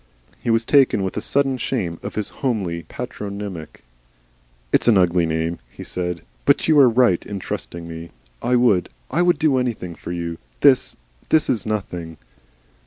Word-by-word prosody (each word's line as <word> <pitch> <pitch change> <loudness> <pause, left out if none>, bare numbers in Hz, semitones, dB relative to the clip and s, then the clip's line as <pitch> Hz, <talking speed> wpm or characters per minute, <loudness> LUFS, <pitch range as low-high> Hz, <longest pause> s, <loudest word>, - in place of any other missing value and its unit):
He - - -3
was 115 0 +2
taken 135 -8 +4
with 95 - -3
a - - -2
sudden 135 -2 +1
shame 90 -13 -2
of - - -6
his 105 -2 -2
homely 100 -10 -1
patronymic. 100 -5 -6 0.9
"It's - - +3
an 115 -4 +6
ugly 90 -2 +3
name," 80 0 -1
he - - -10
said. 90 -2 -3 0.2
"But - - +3
you 155 -2 +5
are 130 -3 +8
right 115 -7 +3
in 100 - -6
trusting 85 -2 -5
me. 85 0 -8 0.3
I 125 - +2
would 115 -7 +3 0.2
I 165 +7 +2
would 175 0 +4
do 145 -4 +3
anything 115 -9 -3
for 85 - -8
you.... 85 -1 -4 0.2
This - - +4 0.4
is 125 -9 +2
nothing." 90 -6 -4
100 Hz, 165 wpm, -21 LUFS, 85-125 Hz, 0.9 s, are